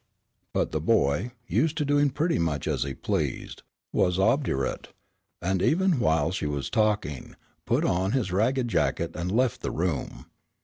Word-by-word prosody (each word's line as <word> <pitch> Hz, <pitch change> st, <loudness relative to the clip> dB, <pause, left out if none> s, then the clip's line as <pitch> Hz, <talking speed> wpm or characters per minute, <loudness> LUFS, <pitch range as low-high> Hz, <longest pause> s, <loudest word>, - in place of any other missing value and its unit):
But -, -, 0 dB
the -, -, -1 dB
boy, 75 Hz, -, +2 dB, 0.2 s
used 150 Hz, +8 st, +1 dB
to 150 Hz, -, 0 dB
doing 145 Hz, 0 st, +3 dB
pretty 155 Hz, +5 st, 0 dB
much 80 Hz, -5 st, -1 dB
as -, -, -1 dB
he 70 Hz, -1 st, -2 dB
pleased, -, -, -3 dB, 0.3 s
was 90 Hz, 0 st, +2 dB
obdurate, 105 Hz, -, 0 dB, 0.6 s
and 95 Hz, +1 st, 0 dB
even 175 Hz, -, +2 dB
while 80 Hz, -5 st, +2 dB
she 90 Hz, -5 st, -2 dB
was 70 Hz, -2 st, -3 dB
talking, 105 Hz, -, 0 dB, 0.3 s
put -, -, +2 dB
on 95 Hz, +3 st, +1 dB
his 125 Hz, -9 st, 0 dB
ragged 120 Hz, +7 st, +1 dB
jacket 85 Hz, -6 st, 0 dB
and 85 Hz, +1 st, -3 dB
left 125 Hz, +2 st, +1 dB
the -, -, -2 dB
room. 85 Hz, -4 st, -3 dB
95 Hz, 160 wpm, -26 LUFS, 80-130 Hz, 0.6 s, doing